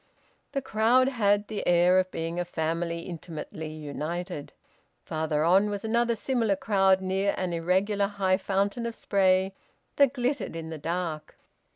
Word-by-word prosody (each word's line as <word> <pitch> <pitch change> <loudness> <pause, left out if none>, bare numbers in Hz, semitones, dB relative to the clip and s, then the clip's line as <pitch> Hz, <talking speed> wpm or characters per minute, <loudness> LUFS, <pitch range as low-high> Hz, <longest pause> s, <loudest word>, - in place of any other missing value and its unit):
The 275 -2 -1
crowd 245 +3 +3
had 205 -5 +2
the 215 -2 -4
air 175 +1 +5
of 185 0 0
being 165 0 -4
a - - +1
family 170 0 -2
intimately 160 -2 -7
united. 155 +2 -5 0.5
Farther 155 -1 -1
on 190 +5 +4
was 205 +1 -4
another 235 +1 +1
similar 225 -3 0
crowd, 190 -1 +3
near 190 +1 0
an 180 -2 -2
irregular 190 +4 +1
high 195 -2 +1
fountain 200 +4 -1
of 230 - -5
spray 190 -1 +2 0.4
that 280 -2 +5
glittered 255 - -2
in 165 -1 -6
the 160 - -6
dark. 165 0 -4
190 Hz, 150 wpm, -27 LUFS, 170-210 Hz, 0.5 s, air